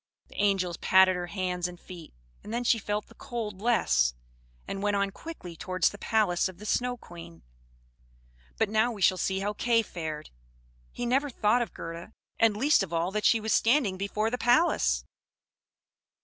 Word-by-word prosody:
The - - -4
angels 190 -4 +1
patted 190 0 +5
her 175 0 -4
hands 180 -2 -2
and 175 -1 -10
feet; 175 -4 -11 0.3
and 210 - -8
then 240 +2 -1
she 230 -1 +3
felt 210 +1 -3
the - - -18
cold 215 -5 -6
less, 65 - +2 0.5
and 195 - -4
went 205 0 +1
on 200 0 0
quickly 195 - -9
towards 185 +2 0
the 205 - -11
palace 200 -5 +1
of 185 - -12
the 210 - -11
Snow 245 +3 0
Queen. 165 - -12 1.1
But - - +2
now 220 +3 +2
we 205 -4 -4
shall 185 +1 +4
see 190 0 -1
how 205 +1 -1
Kay 230 +1 +2
fared. 155 -6 -6 0.6
He 245 - -4
never 270 +4 +1
thought 230 0 +2
of 235 - -4
Gerda, 170 +5 -8 0.3
and 220 -2 +3
least 280 +4 +4
of 190 -4 -4
all 170 +2 0
that 210 +1 -2
she 230 - +5
was 220 0 -1
standing 230 -5 +3
before 210 +3 -2
the 250 - -2
palace. 250 +9 +3
205 Hz, 180 wpm, -28 LUFS, 180-230 Hz, 1.1 s, patted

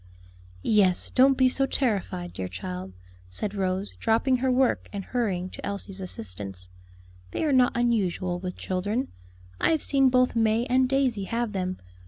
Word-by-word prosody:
"Yes; 195 -4 +3
don't 265 +1 +5
be 260 - +5
so 270 +1 +1
terrified, 195 -9 -1
dear 95 - -4
child," 90 0 -6 0.4
said 195 - -3
Rose, 190 0 -2
dropping 230 +3 +2
her 260 +1 0
work 255 0 +1
and 200 -1 -4
hurrying 200 -8 -1
to - - -10
Elsie's 200 -1 -4
assistance; 95 - -5 0.6
"they - - -3
are 295 - +2
not 250 -2 +4
unusual 190 -7 0
with 180 0 -5
children; 205 +8 -2 0.5
I - - +3
have 320 -2 +1
seen 270 -2 +3
both 250 -1 +3
May 225 +1 +2
and 255 +1 +2
Daisy 260 -7 +1
have 230 +1 -2
them. 185 -1 -2
210 Hz, 160 wpm, -26 LUFS, 185-255 Hz, 0.6 s, don't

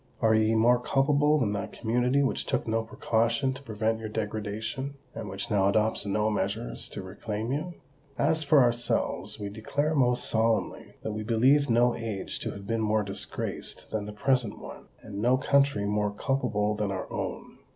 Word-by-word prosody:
are 110 0 +4
ye 110 0 +3
more 120 +2 +5
culpable 145 +4 +3
than 110 -7 +1
that 100 0 -4
community 125 +4 +1
which 135 - -1
took - - -1
no 115 0 +1
precaution 115 +4 0
to 130 - -10
prevent 110 -2 -1
your 110 -1 -5
degradation, 110 +5 -4 0.2
and 105 - -6
which 95 +3 -4
now 100 -2 +3
adopts 110 0 +1
no 105 +2 +1
measures 100 - -2
to 100 - -6
reclaim 105 +4 -4
you? 160 +5 -3 0.4
As 160 +2 +2
for 140 -2 +6
ourselves, 120 0 -1
we 100 - -4
declare 125 +9 -1
most 125 -4 +2
solemnly 110 0 0
that 110 - -2
we 110 - -3
believe 125 +6 +3
no 120 +1 +4
age 110 -4 -4
to - - -3
have 100 -1 -8
been 115 +2 -1
more 110 0 +2
disgraced 100 -1 -3
than 105 -1 -2
the - - -5
present 120 +1 0
one, - - -10 0.2
and 100 -2 -7
no 125 +3 +4
country 140 -5 +2
more 105 0 +1
culpable 105 -2 0
than 105 -1 -2
our 95 -1 -3
own. - - -5
110 Hz, 180 wpm, -28 LUFS, 105-130 Hz, 0.4 s, for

